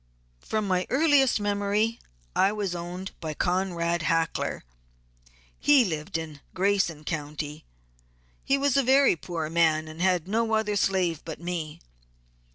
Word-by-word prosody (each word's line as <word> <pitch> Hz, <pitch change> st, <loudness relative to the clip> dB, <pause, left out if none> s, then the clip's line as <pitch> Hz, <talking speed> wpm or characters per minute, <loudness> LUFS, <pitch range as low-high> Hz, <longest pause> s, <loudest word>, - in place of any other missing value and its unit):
From 215 Hz, -, -2 dB
my 185 Hz, -1 st, 0 dB
earliest 275 Hz, -4 st, +4 dB
memory 205 Hz, +2 st, 0 dB, 0.4 s
I 195 Hz, -, +4 dB
was 205 Hz, -4 st, -2 dB
owned 175 Hz, +2 st, -6 dB
by 155 Hz, -2 st, -5 dB
Conrad 175 Hz, -1 st, 0 dB
Hackler; 165 Hz, +1 st, -1 dB, 1.0 s
he 285 Hz, -3 st, +5 dB
lived 155 Hz, -3 st, -3 dB
in 155 Hz, -3 st, -7 dB, 0.2 s
Grason 185 Hz, -5 st, +1 dB
County. 150 Hz, -1 st, -5 dB, 0.8 s
He 275 Hz, -, +2 dB
was 275 Hz, -1 st, +1 dB
a 275 Hz, -, +5 dB
very 270 Hz, -2 st, +4 dB
poor 165 Hz, -1 st, -4 dB
man, 160 Hz, -1 st, +2 dB
and 155 Hz, +2 st, -8 dB
had 180 Hz, -2 st, +2 dB
no 225 Hz, +2 st, +1 dB
other 215 Hz, -1 st, 0 dB
slave 185 Hz, -5 st, +1 dB
but 160 Hz, -2 st, -7 dB
me. 170 Hz, -3 st, -5 dB
180 Hz, 135 wpm, -26 LUFS, 160-210 Hz, 1.0 s, he